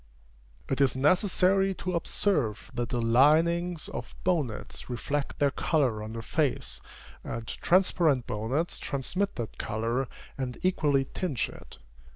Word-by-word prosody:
It 135 - 0
is 135 -2 +4
necessary 185 +6 +3
to 185 0 -3
observe 150 - 0
that 120 -1 -2
the 120 - -1
linings 155 +8 +3
of - - -7
bonnets 150 -15 -2
reflect 140 +4 -2
their 145 -1 +3
color 130 -9 +1
on 110 +1 -6
the 115 0 -5
face, 145 +2 -1 0.4
and 115 - -5
transparent 170 -7 +2
bonnets 125 +11 -2
transmit 185 +9 -1
that 115 -3 -6
color, 115 +4 -1 0.3
and 125 -2 -3
equally 145 -7 +2
tinge 150 -11 -1
it. - - -13
140 Hz, 130 wpm, -28 LUFS, 120-175 Hz, 0.4 s, is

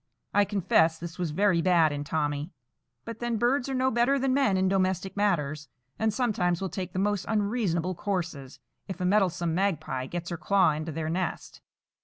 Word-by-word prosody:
I 205 0 +4
confess 175 -5 +2
this 170 +2 -8
was 175 -2 -1
very 180 +2 +2
bad 170 -3 +4
in 145 0 -3
Tommy; 145 0 -2 0.6
but 230 -1 -7
then 240 -1 -1
birds 245 +4 +1
are 265 - -2
no 260 +1 +2
better 240 +4 +2
than 265 -1 +1
men 265 -8 +2
in 190 0 +2
domestic 190 0 0
matters, 155 -8 0 0.3
and 220 0 +2
sometimes 200 -7 0
will 190 - -3
take 185 -2 -5
the - - -4
most 205 0 0
unreasonable 200 -5 0
courses, 175 -8 -4 0.3
if 190 -1 -6
a 180 - -1
meddlesome 180 -4 +1
Magpie 160 -8 -1
gets 175 +3 -5
her 170 - -3
claw 190 -1 +3
into 155 +2 -4
their 160 +1 -3
nest. 185 +2 -4
185 Hz, 185 wpm, -27 LUFS, 165-205 Hz, 0.6 s, I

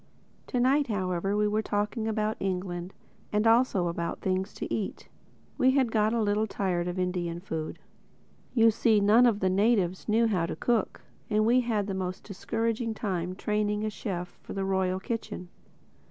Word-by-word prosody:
To 250 - -1
night 270 +4 +3
however 195 -1 -1
we 210 0 +3
were 210 +1 +1
talking 210 +2 -1
about 215 0 0
England—and 185 +3 -4
also 225 -6 +4
about 170 0 -3
things 190 +1 -1
to - - -4
eat. 210 - -4 0.5
We 255 - +5
had 255 -4 +2
got 215 -1 +2
a 230 -1 +1
little 210 +1 +1
tired 180 -4 -1
of 180 +1 -3
Indian 180 -2 -2
food. 160 -4 -5 0.8
You 225 -1 +6
see, 220 0 +3
none 215 +5 +6
of 210 -3 +1
the 190 - +3
natives 195 -2 +1
knew 225 +2 +4
how 185 -7 +1
to - - -4
cook; 235 -3 0 0.3
and 215 0 +2
we 240 +3 +5
had 220 -4 0
the 195 - -3
most 185 -1 -4
discouraging 225 +3 -2
time 185 -5 -2
training 210 +1 -1
a 215 - -1
chef 180 -5 -5
for - - -8
the 195 -1 -2
Royal 190 -1 0
Kitchen. 195 -4 -5
205 Hz, 170 wpm, -28 LUFS, 185-225 Hz, 0.8 s, You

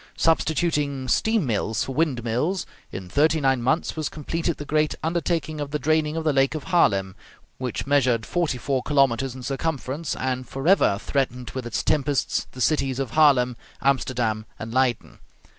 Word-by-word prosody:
Substituting 150 -4 +1
steam 220 - +2
mills 110 -2 0
for 135 - -5
windmills, 145 +4 0 0.3
in 95 -1 -7
thirty 155 - +2
nine 135 -3 +2
months 155 +8 0
was 155 -2 -2
completed 165 +2 -3
the 145 - -7
great 155 +1 +1
undertaking 165 -2 -1
of 145 - -4
the 150 - -1
draining 155 0 +1
of 165 - -2
the 155 -2 +2
lake 135 +2 +2
of 155 - -4
Haarlem, 100 - +2 0.5
which 125 -2 -3
measured 130 -5 +2
forty 170 -7 -1
four 135 +1 -1
kilometres 135 -2 +1
in 130 - -9
circumference, 140 +2 -3
and 130 -1 -3
forever 135 - +3
threatened 125 -2 -2
with 130 -2 -5
its 120 - -2
tempests 145 -2 0
the 125 - -8
cities 135 -2 +1
of 135 -4 -3
Haarlem, 135 -6 +4 0.2
Amsterdam, 120 -5 0
and 115 +1 -7
Leyden. 130 -2 0
135 Hz, 160 wpm, -24 LUFS, 125-155 Hz, 0.5 s, Haarlem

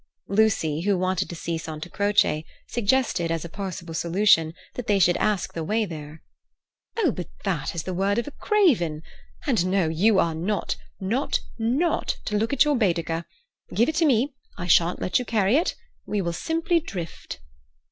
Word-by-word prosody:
Lucy, 195 -7 +2
who 200 +1 +2
wanted 185 +1 0
to 170 - -6
see 165 0 -3
Santa 155 0 -6
Croce, 200 -5 +2 0.2
suggested, 235 -6 +1
as 165 0 -2
a - - -7
possible 180 -3 -6
solution, 170 -1 +3 0.2
that 245 -1 -6
they 205 - +3
should 175 -2 +4
ask 210 -3 0
the 165 - -3
way 215 +6 +1
there. 155 -3 -9 0.7
"Oh, 380 - +3
but 180 -5 -6
that 170 -6 -2
is 165 - -2
the 185 - -4
word 195 +3 +1
of 235 - -1
a - - -5
craven! 235 - +2 0.4
And 230 - +2
no, 185 -2 +2
you 195 +6 +3
are 170 -3 +2
not, 185 +6 -1 0.2
not, 225 +9 0 0.2
not 260 +10 +1
to 210 - -2
look 220 +2 +1
at 280 +1 +4
your 295 -1 +2
Baedeker. 170 -6 0 0.5
Give 235 +6 +3
it 315 - -2
to 335 - +4
me; 270 0 +2 0.2
I 175 - -4
shan't 175 0 +4
let 185 - +1
you - - -2
carry 220 -1 +2
it. 330 +5 +1 0.3
We 210 - -1
will 170 -3 -1
simply 330 - +1
drift." 180 - -7
195 Hz, 180 wpm, -25 LUFS, 170-230 Hz, 0.7 s, should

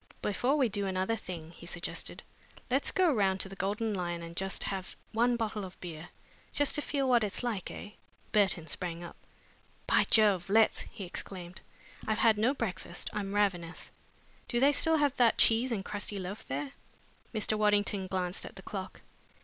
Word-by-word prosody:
"Before 245 +8 +2
we 265 -4 +4
do 200 -2 -1
another 190 +4 0
thing," 170 -6 -7
he 170 0 -12
suggested, 175 0 -3 0.5
"let's 270 +3 +2
go 365 -5 +3
round 195 -4 +2
to 195 - -2
the 195 - -8
Golden 205 +3 -1
Lion 175 -3 -2
and 170 - -6
have - - -13 0.3
just 190 -1 -4 0.2
one 240 +2 +3
bottle 215 -2 -2
of 190 -1 -9
beer 170 -1 -7 0.4
just 290 -1 +2
to 295 - +2
feel 280 -2 0
what 240 -3 +5
it's 205 +3 -1
like, 220 -7 -2
eh?" 210 - -7 0.4
Burton 190 -6 +3
sprang 170 +2 -4
up. 170 - -9 0.7
"By - - +4
Jove, 200 -5 +5
let's!" 220 +2 +4
he 220 -4 -8
exclaimed. 180 0 -7 0.5
"I've 220 -1 +1
had 220 -2 +4
no 245 +6 +3
breakfast. 185 -7 -4
I'm 205 -1 -3
ravenous. 180 -5 0 0.6
Do 240 - 0
they 280 +3 +5
still 320 +3 +4
have 290 -3 +2
that 240 -2 +5
cheese 230 +3 +5
and 200 -4 -2
crusty 205 0 -3
loaf 190 +2 -6
there?" 140 +1 -3 0.6
Mr. 215 -1 0
Waddington 205 -2 +2
glanced 185 -1 -1
at - - -9
the 190 - -11
clock. 190 -2 -6
205 Hz, 180 wpm, -31 LUFS, 185-230 Hz, 0.7 s, what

